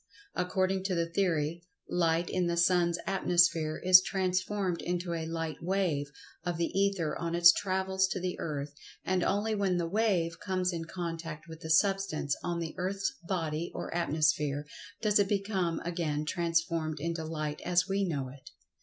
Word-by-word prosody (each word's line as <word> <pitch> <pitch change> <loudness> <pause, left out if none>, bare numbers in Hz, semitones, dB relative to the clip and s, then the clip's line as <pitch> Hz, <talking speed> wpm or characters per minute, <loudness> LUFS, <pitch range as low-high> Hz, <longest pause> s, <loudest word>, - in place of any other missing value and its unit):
Ac[Pg 180 0 -1
101]cording 190 0 +1
to 190 -2 0
the 170 0 +1
theory, 170 -3 0 0.3
Light 170 -1 +1
in 180 -1 0
the 170 0 -1
Sun's 170 0 +3
atmosphere 170 -4 +2
is 185 0 +9
transformed 185 -1 -1
into 175 0 -2
a 160 -1 -3
Light 165 -2 -3
wave 175 -5 0 0.4
of 175 -1 -2
the 170 +1 -2
Ether 195 -6 +1
on 170 0 -2
its 175 0 +9
travels 190 0 0
to 190 - -3
the 180 0 -2
earth, 145 -2 -4 0.3
and 185 -1 +1
only 210 +3 +1
when 195 -3 +1
the 170 - 0
"wave" 180 -4 +1
comes 185 -1 -1
in 165 -1 -4
contact 165 -3 -5
with 160 -1 -9
the 160 - -8
Substance 185 -4 +2
on 175 -1 -1
the 165 -1 -4
earth's 195 +2 -1
body 165 -3 -2
or - - -5
atmosphere 150 -3 +1 0.4
does 210 -1 +4
it 200 -1 +2
become 195 -5 0
again 165 -3 -2
transformed 165 -1 0
into 165 +1 -2
Light 155 -2 -4
as 180 +1 +2
we 195 0 0
know 145 -8 -2
it. 135 +1 -13
175 Hz, 170 wpm, -30 LUFS, 160-190 Hz, 0.4 s, is